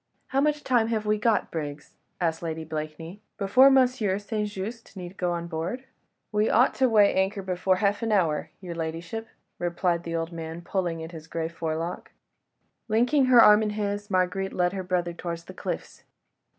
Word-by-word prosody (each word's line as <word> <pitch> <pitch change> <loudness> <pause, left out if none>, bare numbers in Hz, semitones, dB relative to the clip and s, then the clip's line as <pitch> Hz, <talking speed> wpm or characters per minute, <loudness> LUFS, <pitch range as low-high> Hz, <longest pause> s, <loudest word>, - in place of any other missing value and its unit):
"How 270 0 +2
much 300 0 +1
time 240 -3 +2
have 220 -2 -1
we 210 0 +1
got, 225 0 +1
Briggs?" 145 -3 -5 0.3
asked 165 -3 0
Lady 160 -1 -4
Blakeney, 160 +4 -6 0.2
"before 225 +7 +6
M. 265 -1 +7
St. 210 -3 -2
Just 210 +2 -7
need 180 0 -7
go 180 -2 -1
on 170 -1 -3
board?" 170 +10 -4 0.5
"We 210 0 +2
ought 245 +4 +4
to 260 -1 +4
weigh 210 -3 +5
anchor 190 +1 0
before 185 0 +1
half 200 +2 +1
an 225 -1 -1
hour, 170 -7 +1
your 180 -2 -6
ladyship," 165 +7 -5 0.3
replied 175 0 0
the 170 -1 -4
old 165 +1 -2
man, 165 0 -6
pulling 175 -3 -2
at 160 - -8
his 160 -2 -10
grey 160 0 -3
forelock. 165 +1 -4 0.8
Linking 245 +6 +3
her 250 -2 +7
arm 210 +1 +7
in 215 - 0
his, 205 0 -2
Marguerite 190 +1 0
led 180 0 +1
her 195 - -3
brother 180 -1 -1
towards 170 -1 -5
the - - -11
cliffs. - - -5
185 Hz, 180 wpm, -26 LUFS, 170-215 Hz, 0.8 s, M